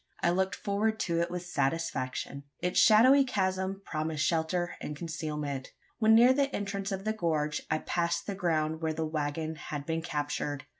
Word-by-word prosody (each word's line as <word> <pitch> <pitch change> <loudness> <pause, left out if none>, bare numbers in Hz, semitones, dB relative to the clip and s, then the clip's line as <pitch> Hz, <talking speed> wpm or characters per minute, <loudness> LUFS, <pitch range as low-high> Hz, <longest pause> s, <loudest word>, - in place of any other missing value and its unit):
I 170 - +4
looked 190 +2 0
forward 215 +2 -1
to 170 -1 0
it 170 +1 0
with 180 0 -5
satisfaction. 140 -3 -2 0.2
Its 180 - +1
shadowy 255 +6 +7
chasm 190 -4 -1
promised 155 -1 -1
shelter 170 +1 0
and 150 - -5
concealment. 150 -4 -4 0.3
When 220 -1 +6
near 245 +3 +7
the 280 +1 +2
entrance 200 0 -3
of 195 +1 -4
the 215 - +1
gorge, 155 -6 -1
I 155 - +2
passed 170 +1 -1
the 200 - -3
ground 160 -4 0
where 160 -1 0
the 160 0 -2
waggon 155 +1 -2
had 145 -2 -6
been 165 +1 -1
captured. 145 -3 -3
170 Hz, 170 wpm, -30 LUFS, 155-195 Hz, 0.3 s, shadowy